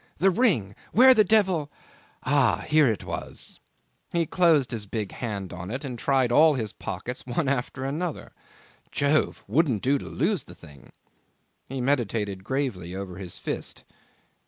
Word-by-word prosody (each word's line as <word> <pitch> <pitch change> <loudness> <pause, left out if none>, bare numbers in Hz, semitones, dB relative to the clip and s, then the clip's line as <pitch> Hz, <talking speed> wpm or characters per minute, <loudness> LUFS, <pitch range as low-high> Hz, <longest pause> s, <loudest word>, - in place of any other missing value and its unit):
The 195 +2 +4
ring! 170 - +2 0.2
Where 260 +2 +8
the 220 -3 +5
devil... 185 -8 +2 0.5
Ah! 130 -7 +2
Here 155 -2 +5
it 110 -3 -1
was... - - -5 0.5
He 170 -1 +1
closed 160 -6 +3
his 110 -4 -4
big 105 -2 -3
hand 100 -6 -5
on 90 +1 -7
it, 130 +6 -4
and 125 -3 -6
tried 130 -1 +2
all 155 +4 +6
his 110 -5 -3
pockets 125 +1 -5
one 135 +5 -1
after 130 0 -2
another. 155 +4 -4 0.6
Jove! 145 +2 +1
wouldn't 140 - +1
do 140 +2 +2
to - - -8
lose 185 +6 -1
the 90 - -13
thing. 75 -5 -16 0.8
He 135 0 -3
meditated 110 -7 -1
gravely 105 -8 -3
over 95 -2 -6
his 95 -2 -7
fist. - - -4
130 Hz, 155 wpm, -26 LUFS, 105-155 Hz, 0.8 s, Where